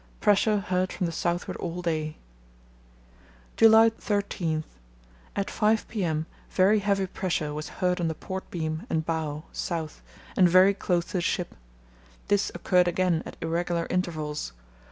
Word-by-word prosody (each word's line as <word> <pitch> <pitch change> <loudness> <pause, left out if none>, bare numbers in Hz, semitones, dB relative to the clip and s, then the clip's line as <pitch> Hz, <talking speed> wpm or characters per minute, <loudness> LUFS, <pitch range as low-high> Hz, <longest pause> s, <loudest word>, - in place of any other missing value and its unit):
Pressure 210 +1 +3
heard 185 -1 0
from 180 - -2
the 170 - -1
southward 170 +1 -2
all 175 +1 -4
day. 155 -2 -2 1.4
"July 225 0 +7
13.—At 155 - -4
5 215 0 +2
p.m. 165 -8 -1 0.2
very 200 +3 +4
heavy 200 -1 +1
pressure 175 -5 -2
was 150 +1 -5
heard 180 -1 0
on 170 - +1
the 160 - -2
port 190 +3 -6
beam 160 +3 -3
and 160 -6 0
bow 155 -2 -2
(south) 160 -3 -4 0.3
and 185 -3 +5
very 185 +3 +6
close 175 -3 0
to - - -12
the - - 0
ship. 175 +1 -1 0.8
This 205 -1 +2
occurred 180 -1 +3
again 175 -2 +1
at - - -10
irregular 170 +1 -1
intervals. 155 - -2
175 Hz, 140 wpm, -27 LUFS, 160-190 Hz, 1.4 s, July